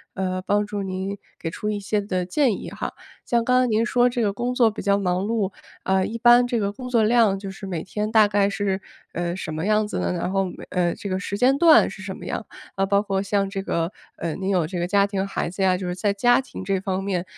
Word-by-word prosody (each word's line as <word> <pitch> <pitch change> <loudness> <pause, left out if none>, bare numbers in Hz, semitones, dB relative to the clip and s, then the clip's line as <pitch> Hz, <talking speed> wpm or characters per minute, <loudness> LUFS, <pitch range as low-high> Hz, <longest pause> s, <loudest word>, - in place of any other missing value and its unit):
呃， 185 -1 -2
帮 205 +2 +1
助 205 -1 -4
您 190 +1 -3 0.2
给 165 - -4
出 210 - -4
一 210 -1 -2
些 205 +1 -1
的 185 -3 -2
建 235 +3 +1
议 - - -8
哈。 - - -5 0.3
像 235 -1 +1
刚 250 0 +4
才 255 - +2
您 225 +1 +2
说 245 +1 +3
这 240 -2 -1
个 200 - +1
工 245 +4 -2
作 235 -3 +4
比 - - -6
较 200 -1 +2
忙 185 -1 0
碌， 210 -3 0 0.3
呃， 190 0 +2
一 230 +4 -3
般 240 +1 +6
这 240 -2 0
个 200 -1 0
工 250 +3 -8
作 235 -3 +3
量 220 -3 +4
就 195 0 -6
是 195 0 -9
每 170 -4 -3
天 210 +3 -3
大 220 -2 +6
概 200 -1 +2
是， 195 -1 -1 0.3
呃， 175 0 -2
什 155 -4 -5
么 160 +6 -2
样 215 0 +2
子 - - -3
呢？ - - 0
然 180 +1 -2
后 195 -1 +1
每 180 - -8
呃， 175 -2 +1
这 200 - -7
个 185 - -1
时 200 0 -4
间 255 +4 +4
段 330 -2 +7
是 190 - -10
什 190 0 -6
么 - - -10
样？ - - -4 0.3
啊， 195 0 0
包 200 +1 +2
括 195 -2 -1
像 200 0 0
这 195 0 -4
个， 170 -2 -1 0.3
呃， 165 -2 -3
您 190 0 -3
有 180 -4 +2
这 175 +2 -4
个 175 - -1
家 200 +1 +3
庭 200 -1 -2
孩 195 - -2
子 185 +3 -6
呀， 185 -1 +3
就 185 - -5
是 180 - -2
在 200 +2 0
家 245 +6 +3
庭 255 - -9
这 195 0 0
方 190 -1 -2
面 185 -3 -1
200 Hz, 285 characters per minute, -23 LUFS, 190-215 Hz, 0.3 s, 段